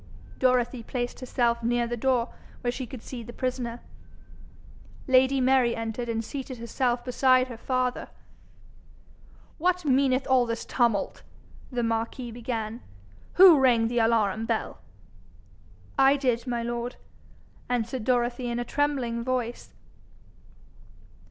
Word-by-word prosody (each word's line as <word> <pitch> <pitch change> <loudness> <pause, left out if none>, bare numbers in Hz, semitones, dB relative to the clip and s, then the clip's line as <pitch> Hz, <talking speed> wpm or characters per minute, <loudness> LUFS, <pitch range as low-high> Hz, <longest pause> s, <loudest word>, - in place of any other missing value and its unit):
Dorothy 250 -1 +2
placed 245 +1 -4
herself 240 -2 0
near 240 +1 +1
the 240 +1 -3
door, 250 0 0 0.3
where 245 - 0
she 250 0 -5
could 240 -1 -9
see 250 -3 -7
the 235 +1 -9
prisoner. 245 -2 -3 1.3
Lady 260 +1 +4
Mary 255 -2 +3
entered 225 +1 -4
and 225 -1 -2
seated 265 -1 -6
herself 240 +1 -1
beside 255 0 +3
her 235 - -7
father. 255 0 -1 1.5
'What 360 +1 +1
meaneth 265 -1 +2
all 255 -2 +3
this 230 0 -3
tumult?' 235 -5 0 0.5
the 245 -1 -1
marquis 230 +2 -2
began. 230 -1 -4 0.5
'Who 355 -5 +8
rang 235 -4 +3
the 240 0 0
alarum 225 -1 +1
bell?' 225 -1 -2 1.2
'I 270 +1 +6
did, 250 -3 0
my 240 -1 -1
lord,' 240 +1 -3 0.7
answered 245 0 -1
Dorothy 245 0 0
in 235 - -2
a 240 - -2
trembling 260 -6 -1
voice. 245 -1 -3
245 Hz, 125 wpm, -27 LUFS, 235-260 Hz, 1.5 s, Who